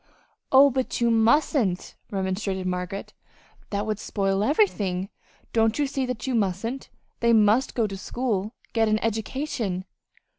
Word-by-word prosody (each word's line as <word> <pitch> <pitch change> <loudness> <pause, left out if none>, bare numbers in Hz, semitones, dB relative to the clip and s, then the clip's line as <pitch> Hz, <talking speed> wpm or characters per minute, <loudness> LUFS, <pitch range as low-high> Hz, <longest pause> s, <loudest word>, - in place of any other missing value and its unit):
"Oh, 275 +1 +7
but 260 0 -2
you 235 -1 +3
mustn't," 225 - +2 0.2
remonstrated 190 -1 -2
Margaret. 180 +2 -4 0.6
"That 205 0 -2
would 215 -1 -2
spoil 195 -1 0
everything. 205 - +1 0.4
Don't 225 -1 +2
you 295 - +2
see 270 -1 -2
that 250 -4 -4
you 265 - -1
mustn't? 225 +4 -1 0.3
They 235 0 +3
must 220 +4 +4
go 230 - +2
to 195 -2 -4
school 220 -1 -2 0.2
get 225 -1 +3
an 215 0 +3
education." 225 -4 -2
220 Hz, 140 wpm, -25 LUFS, 195-250 Hz, 0.6 s, Oh